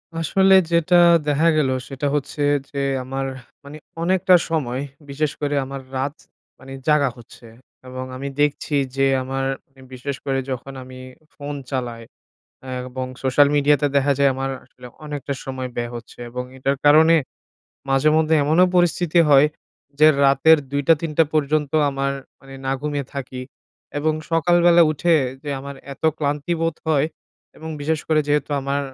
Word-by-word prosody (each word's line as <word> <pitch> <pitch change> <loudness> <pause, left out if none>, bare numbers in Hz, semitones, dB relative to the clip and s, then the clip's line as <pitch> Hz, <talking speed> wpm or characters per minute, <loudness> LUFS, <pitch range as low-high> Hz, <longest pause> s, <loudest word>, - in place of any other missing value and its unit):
আসলে 190 +4 +3 0.2
যেটা 170 +1 +3 0.3
দেখা 150 +3 +2
গেলো 135 -3 +2 0.2
সেটা 135 +1 -3
হচ্ছে 145 +1 -3 0.3
যে 140 - -9 0.3
আমার, 135 +1 -4 0.4
মানে 150 +2 -9 0.3
অনেকটা 185 0 +4
সময়, 135 -5 -2 0.3
বিশেষ 145 +1 -1
করে 145 0 -1
আমার 135 0 -7
রাত, 140 +3 -2 0.4
মানে 135 0 -12 0.2
জাগা 145 -3 +3
হচ্ছে 120 0 -15 0.4
এবং 130 0 -6
আমি 140 +2 -5
দেখছি 145 0 0 0.2
যে 135 0 +2 0.2
আমার 135 +1 -3 0.3
এম 130 - -14
বিশেষ 135 +2 -5
করে 135 -1 0
যখন 130 +2 -6
আমি 130 0 -12 0.4
ফোন 145 0 -6 0.2
চালাই, 120 -3 -3 0.6
আ - - -10 0.2
এবং 130 0 -4 0.2
social 135 +2 +4
media 145 +1 +4
তে 145 - +3
দেখা 140 +1 +3
যায় 140 -1 +5
আমার 135 0 -3 0.2
আসলে 125 -1 -14 0.2
অনেকটা 145 -1 -4
সময় 130 -1 -4
ব্যয় 120 0 -3
হচ্ছে 120 0 -10
এবং 125 +1 -5
এটার 135 +1 -1
কারণে, 160 +3 +6 0.8
মাঝে 135 +3 +3
মধ্যে 160 0 +2
এমনও 160 +6 +4
পরিস্থিতি 175 -1 +2
হয় 140 +1 +7 0.5
যে 155 - +7 0.2
রাতের 140 +4 +5
২ 145 0 -1
টা 165 - +8
৩ 160 -2 -3
টা 165 - +7
পর্যন্ত 150 0 0 0.2
আমার 135 0 -1 0.3
মানে 135 0 -13
না - - 0
ঘুমিয়ে 145 -2 -3
থাকি। 130 -2 -6 0.6
এবং 155 +1 +1 0.2
সকালবেলা 175 +1 +5
উঠে 170 +3 +2 0.3
যে 150 - -7
আমার 140 0 -8 0.2
এত 135 - -15 0.2
ক্লান্তি 145 +3 -1
বোধ 165 -1 -1
হয়, 150 -1 +2 0.5
এবং 160 - -9
বিশেষ 155 +1 -1
করে 155 -1 +3
যেহেতু 150 0 0
আমার 140 +1 -1
145 Hz, 160 wpm, -21 LUFS, 135-155 Hz, 0.8 s, টা